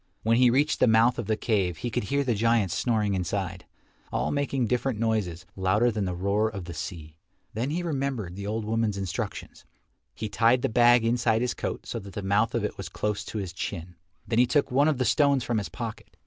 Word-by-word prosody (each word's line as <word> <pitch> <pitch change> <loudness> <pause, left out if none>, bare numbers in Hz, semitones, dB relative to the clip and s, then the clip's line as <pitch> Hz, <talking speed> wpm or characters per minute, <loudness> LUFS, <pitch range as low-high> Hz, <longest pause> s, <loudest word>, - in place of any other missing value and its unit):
When 115 +1 +3
he 125 0 +6
reached 140 +5 +2
the - - +5
mouth 115 +2 +4
of 115 - -4
the 110 -1 +1
cave 95 -8 0
he 120 - -4
could 105 - -1
hear 140 +5 +1
the 125 -3 +1
giants 110 -4 +2
snoring 110 -4 +1
inside, 95 0 -3 0.4
all - - -1
making 140 -3 0
different 125 +1 0
noises, 105 -6 -1
louder 105 +6 +2
than 105 -3 -2
the 90 -1 -2
roar 100 +4 +1
of 100 -5 -7
the 85 - -7
sea. 80 0 -7 0.4
Then 120 +5 -2
he 170 +4 -2
remembered 135 - -2
the 100 +1 -6
old 110 +1 -2
woman's 110 -2 0
instructions. 95 -3 -5 0.5
He 110 - -4
tied 115 +4 +3
the - - +2
bag 120 0 +5
inside 115 -1 +2
his 125 - 0
coat - - -4
so 115 - -4
that 100 -2 -11
the 105 - -5
mouth 105 +3 +1
of - - 0
it - - -4
was - - -6
close 105 -1 -2
to - - -6
his 95 -3 -4
chin. 90 -2 -5 0.3
Then 115 -1 +1
he 125 - +5
took 145 -1 +1
one 140 +4 +4
of 155 -4 +2
the 130 - 0
stones 140 +1 +3
from 120 -3 0
his 100 - -5
pocket. 110 -6 -7
110 Hz, 225 wpm, -27 LUFS, 100-120 Hz, 0.5 s, he